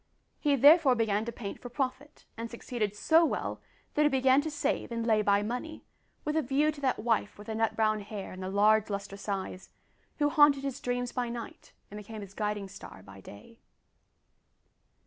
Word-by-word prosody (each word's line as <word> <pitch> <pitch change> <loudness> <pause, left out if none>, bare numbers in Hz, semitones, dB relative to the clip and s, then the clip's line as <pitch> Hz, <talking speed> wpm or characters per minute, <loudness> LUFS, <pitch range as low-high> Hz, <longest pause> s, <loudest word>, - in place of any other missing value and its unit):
He 290 -2 +2
therefore 285 0 +6
began 220 -2 0
to 235 - -4
paint 210 -3 -7
for 245 - -8
profit, 270 +3 -4
and 230 0 -5
succeeded 230 -3 -3
so 320 +9 +4
well 325 - -2 0.3
that 300 - +1
he 300 - +5
began 265 0 +4
to 315 - -4
save 290 -3 -2
and 230 -1 -2
lay 220 -2 +3
by 200 0 +2
money, 250 +9 -5 0.4
with 300 +1 -1
a 320 - +3
view 285 +3 +1
to 290 -1 -11
that 265 -2 +1
wife 225 -2 0
with 210 - -11
the 220 - -4
nut 225 0 0
brown 215 -1 +2
hair 205 -1 -7
and 185 - -9
the 185 - -4
large 210 +2 +3
lustrous 200 0 -5
eyes, 190 -1 -4 0.5
who 290 -1 +2
haunted 290 -2 +5
his 275 -2 -3
dreams 245 0 -2
by 245 -1 -2
night 235 -1 -8 0.2
and 210 - -7
became 215 +1 -8
his 200 -1 -10
guiding 210 -1 -2
star 190 - -12
by 100 0 -13
day. 105 - -14
230 Hz, 195 wpm, -30 LUFS, 205-275 Hz, 0.5 s, therefore